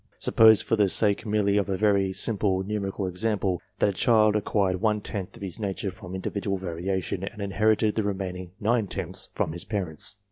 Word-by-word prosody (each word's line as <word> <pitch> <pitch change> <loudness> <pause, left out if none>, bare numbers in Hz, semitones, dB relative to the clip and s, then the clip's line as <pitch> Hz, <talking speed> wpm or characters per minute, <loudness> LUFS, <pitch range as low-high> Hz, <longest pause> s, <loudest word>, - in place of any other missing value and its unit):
Suppose, 110 -1 +5
for - - +1
the 105 -3 +3
sake 105 +3 +2
merely 105 -1 +2
of 100 0 0
a 95 - 0
very 100 -2 +2
simple 95 -2 0
numerical 100 -1 -3
example, 95 -1 -1 0.2
that - - +2
a - - -2
child 110 +1 +3
acquired 95 -3 0
one 105 -1 +2
tenth 100 -2 -5
of - - -10
his 95 +2 -6
nature 100 -1 -3
from 95 -1 -9
individual 100 +1 -3
variation, 95 +1 -3
and 105 +2 -6
inherited 105 +2 +1
the 110 - 0
remaining 95 -3 -4
nine 110 0 +1
tenths - - -3
from - - -1
his 85 +2 -4
parents. 95 -4 0
100 Hz, 185 wpm, -26 LUFS, 95-105 Hz, 0.2 s, Suppose